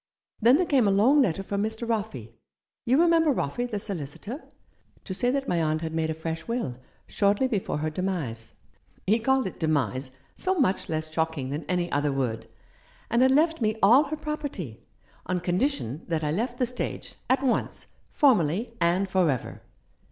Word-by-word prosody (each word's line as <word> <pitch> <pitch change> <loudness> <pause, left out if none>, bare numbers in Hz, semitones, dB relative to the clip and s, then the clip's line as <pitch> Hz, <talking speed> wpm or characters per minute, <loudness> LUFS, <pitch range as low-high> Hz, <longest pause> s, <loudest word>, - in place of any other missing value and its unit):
Then 240 +5 +6
there 365 - +2
came 265 -9 +3
a - - +4
long 245 +9 +5
letter 195 -5 0
from 200 +1 -2
Mr. 220 +2 -3
Roffey 200 - -3 0.3
— - - -66
you 260 +5 +4
remember 330 -2 +4
Roffey, 240 +13 -2
the 210 -3 -2
solicitor? 200 - -5 0.3
— - - -35
to 190 - -4
say 245 +6 0
that 275 +1 -1
my 170 -1 +1
aunt 155 0 0
had 160 -1 -4
made 160 -1 0
a 160 - -2
fresh 160 +1 -5
will 230 - -2 0.3
shortly 205 +5 +2
before 210 - -2
her 155 +1 -2
demise 155 -11 -3 0.3
— 90 -1 -35
he 215 +4 +3
called 265 +2 +2
it 190 - -6
demise; 140 -5 0 0.2
so 375 0 -1
much 195 -9 +1
less 155 0 -3
shocking 160 -5 -1
than 145 +2 -4
any 175 +1 -1
other 145 0 +1
word 120 -5 -2 0.3
— - - -30
and 235 +2 +3
had 260 - +6
left 315 +3 +3
me 215 -1 +1
all 250 +9 +7
her 310 +2 -4
property, 290 - -5 0.5
on 180 +1 0
condition 175 - -1
that 160 -2 -1
I 150 - 0
left 235 +8 -2
the 250 - +2
stage, 250 +1 -5 0.2
at 260 +1 +2
once, 260 - -1 0.2
formally, 230 - +2
and 175 +3 +2
for 185 -3 +2
ever. 130 -4 -3
195 Hz, 190 wpm, -26 LUFS, 155-250 Hz, 0.5 s, all